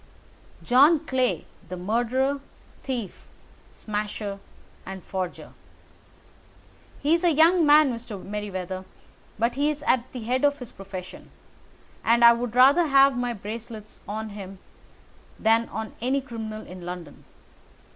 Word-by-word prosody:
"John 285 +6 +5
Clay, 255 -2 0 0.2
the 185 - -5
murderer, 245 +8 0 0.4
thief, 245 -7 -5 0.4
smasher, 210 -1 -4 0.4
and 190 -1 -8
forger. 185 -2 -5 1.5
He's 330 +4 +3
a 350 - +5
young 325 +2 +5
man, 295 -3 +6
Mr. 230 -3 -7
Merryweather, 190 -2 -5 0.5
but 230 +3 +1
he 285 +3 +1
is 300 -1 -4
at 250 0 +1
the 250 -3 -6
head 255 +4 0
of 285 0 +3
his 250 -4 -9
profession, 190 -1 -9 0.7
and 235 +1 +5
I 235 - +10
would 235 0 -4
rather 280 +7 +6
have 275 -1 +5
my 245 0 -1
bracelets 220 +1 -8
on 215 +1 -4
him 195 -2 -9 0.8
than 225 +1 +2
on 220 -1 -5
any 260 +3 +1
criminal 220 -4 -7
in 180 0 -10
London. 175 -4 -8
235 Hz, 125 wpm, -25 LUFS, 205-265 Hz, 1.5 s, I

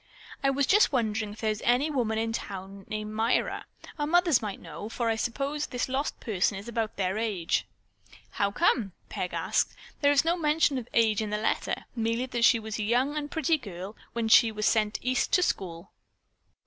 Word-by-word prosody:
"I 275 - +4
was 275 +1 +2
just 420 +2 +5
wondering 220 -5 -1
if 215 - -12
there 220 -1 +1
is 215 - -5
any 255 +6 +2
woman 230 -6 0
in 225 0 -1
town 195 -2 -6
named 215 0 -4
Myra. 225 +3 0 0.3
Our 295 - 0
mothers 345 -4 +4
might 205 -3 -4
know, 170 +6 -8
for 230 0 -1
I - - +1
suppose 275 +6 -2
this 250 -2 -2
lost 270 +3 -2
person 200 -3 0
is 200 +3 -8
about 225 -2 -2
their 190 +2 0
age." 205 -7 -1 0.6
"How 200 - 0
come?" 210 - +1 0.2
Peg - - -3
asked. - - 0 0.3
"There 285 -1 +5
is 285 +2 +3
no 335 +1 +3
mention 300 -4 +2
of 240 - -9
age 220 -2 +3
in 215 - -3
the 210 - -1
letter. 215 - -1
Merely 230 +1 0
that 240 -2 +1
she 235 - +6
was 220 0 -5
a - - -1
young 250 +7 +1
and 295 -1 -3
pretty 320 0 +1
girl 195 -3 -8 0.2
when 235 -1 -1
she 225 +1 +6
was 215 0 -2
sent 215 -1 +2
East 255 0 0
to 360 - +5
school." 175 - -3
230 Hz, 200 wpm, -28 LUFS, 210-275 Hz, 0.6 s, she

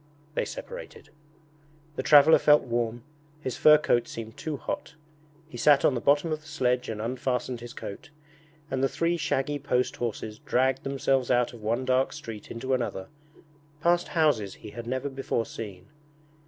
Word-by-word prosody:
They - - 0
separated. - - -9 0.9
The - - -2
traveller 150 +1 +7
felt 150 0 +5
warm, 120 -1 -2 0.4
his 130 -4 -4
fur 150 0 +7
coat 120 -5 +1
seemed 110 -1 -7
too 155 -2 -4
hot. 150 - -5 0.5
He 130 - -10
sat 140 +3 +5
on - - +4
the 120 - -2
bottom 145 +5 +3
of 155 0 -2
the 155 - -17
sledge 125 -5 0
and 110 -1 -4
unfastened 125 +1 -2
his 120 +1 -9
coat, 100 - -8 0.6
and 130 0 0
the 135 - +3
three 170 +1 0
shaggy 145 -2 -1
post 125 -3 0
horses 110 -2 -4
dragged 130 +1 +1
themselves 135 -2 0
out 125 -1 +2
of 115 - -11
one 115 +4 -1
dark 130 +1 +2
street 110 -3 -8
into 130 +3 -3
another, 120 -7 -2 0.7
past 175 +2 +2
houses 125 -12 +2
he 105 - -11
had 120 +1 -8
never 130 +3 -2
before 135 -4 -2
seen. 95 -5 -8
130 Hz, 170 wpm, -27 LUFS, 115-145 Hz, 0.9 s, traveller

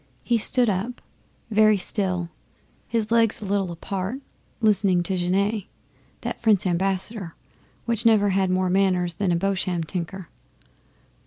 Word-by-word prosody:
He 235 -1 +1
stood 245 +3 +4
up, 210 +5 -2 0.5
very 215 0 +5
still, 180 -3 -1 0.6
his 225 -2 -1
legs 230 -2 +3
a 210 - -7
little 195 -2 -1
apart, 190 +7 -4 0.4
listening 195 -5 +2
to 190 +2 -2
Genet, 195 +3 0 0.6
that - - -5
French 210 -4 +3
Ambassador, 190 +1 -1 0.5
which 235 -1 0
never 215 -3 +4
had 190 0 +1
more 185 0 +1
manners 185 -2 +2
than 185 +2 -1
a - - +2
Bosham 185 -1 -1
tinker. 175 +2 -5
195 Hz, 135 wpm, -24 LUFS, 180-215 Hz, 0.6 s, very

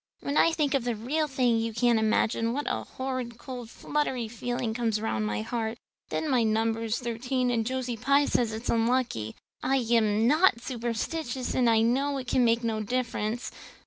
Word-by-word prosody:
When 280 - -3
I 330 - +5
think 300 -4 0
of 275 -3 +1
the 240 -1 -1
real 290 +8 -1
thing 250 -4 +2
you 225 -1 -2
can't 240 -1 +3
imagine 225 +1 +1
what 290 +3 -2
a - - -2
horrid 255 -3 -4
cold 245 -3 -8
fluttery 260 -4 -2
feeling 240 0 -3
comes 225 -2 0
round 110 - -1
my 105 0 -2
heart. 225 - -3 0.3
And - - -1
then 305 - -1
my 250 -2 +4
number 225 0 +1
is 225 +1 0
thirteen 245 +1 -1
and 225 -2 0
Josie 255 -2 -2
Pye 280 +5 +3
says 235 -5 +1
it's 220 +2 -6
so - - +1
unlucky. 230 - 0 0.3
I 265 +1 +1
am 225 -3 +2
not 305 -3 +4
superstitious 240 +2 -3
and 245 -2 +3
I 225 -1 +4
know 275 +5 +1
it 260 - -5
can 250 0 +3
make 230 0 +3
no 220 -2 -1
difference. 235 0 -2
240 Hz, 195 wpm, -28 LUFS, 225-260 Hz, 0.3 s, I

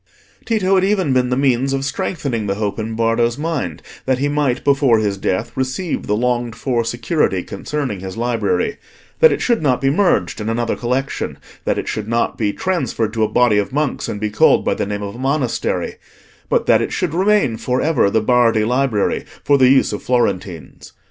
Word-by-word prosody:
Tito 205 -5 +1
had 190 -1 +4
even 190 -8 +1
been 125 -1 +2
the 125 - 0
means 135 0 +1
of 135 0 -1
strengthening 135 - -2
the 100 - -1
hope 105 0 -3
in 110 +1 -4
Bardo's 115 +1 +1
mind 145 - -3 0.2
that 130 -1 +2
he 140 +3 0
might 145 -3 0
before 140 -4 +3
his 105 -2 0
death 95 -1 -2
receive 130 +7 -2
the 105 - +1
longed 120 0 -1
for 120 -1 -1
security 120 - 0
concerning 120 +1 -4
his 95 +1 -7
library: 120 - 0 0.4
that 475 - +7
it - - -1
should 235 -6 +1
not 130 -5 +2
be 135 0 +2
merged 180 - +1
in 105 - -3
another 115 0 -1
collection; 130 +3 -2 0.3
that - - 0
it - - -3
should 105 -1 -3
not 115 +1 0
be 105 -2 0
transferred 125 - -2
to 110 -1 0
a - - +3
body 115 -3 +3
of 100 - -2
monks, 150 0 -1
and 105 - -4
be 105 0 -2
called - - +4
by - - +2
the - - -3
name 105 0 -4
of 100 0 -5
a 120 - -10
monastery; 135 -1 -1 0.5
but - - +1
that - - +4
it - - -2
should 175 -4 -2
remain 190 - +2
for 125 +3 -1
ever 150 -9 +2
the 110 - +1
Bardi 115 -1 +3
Library, 125 -2 0 0.2
for 140 -1 +3
the 130 -1 +6
use 130 -4 +3
of 105 - -4
Florentines. 95 - -2
125 Hz, 200 wpm, -18 LUFS, 110-140 Hz, 0.5 s, that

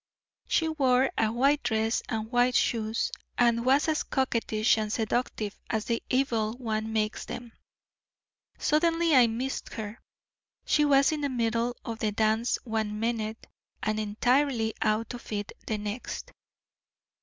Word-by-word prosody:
She 325 - +2
wore 265 -4 +2
a 220 -1 +2
white 275 +5 +3
dress 220 0 0
and 220 0 -3
white 245 0 +3
shoes, 225 -1 +1 0.3
and 235 -1 +3
was 270 +5 +3
as 310 -1 +1
coquettish 230 -4 +1
and 215 -1 -2
seductive 220 -2 -2
as 220 -2 -1
the 230 -1 -1
evil 230 -5 +1
one 220 -3 -3
makes 215 -1 -1
them. 240 -1 -7 1.1
Suddenly 330 +1 +2
I 250 -2 +7
missed 245 +4 -4
her. 215 0 -6 0.7
She 300 - +3
was 275 0 +5
in 305 -1 -2
the 285 - 0
middle 235 -1 0
of 230 -2 -5
the 215 -1 0
dance 220 +2 +1
one 220 -3 -2
minute 225 -1 -2 0.4
and 215 0 0
entirely 225 +2 +1
out 215 +3 0
of 245 - -9
it 205 -1 -3 0.2
the 215 - -1
next. 210 +3 -5
230 Hz, 145 wpm, -28 LUFS, 220-260 Hz, 1.1 s, I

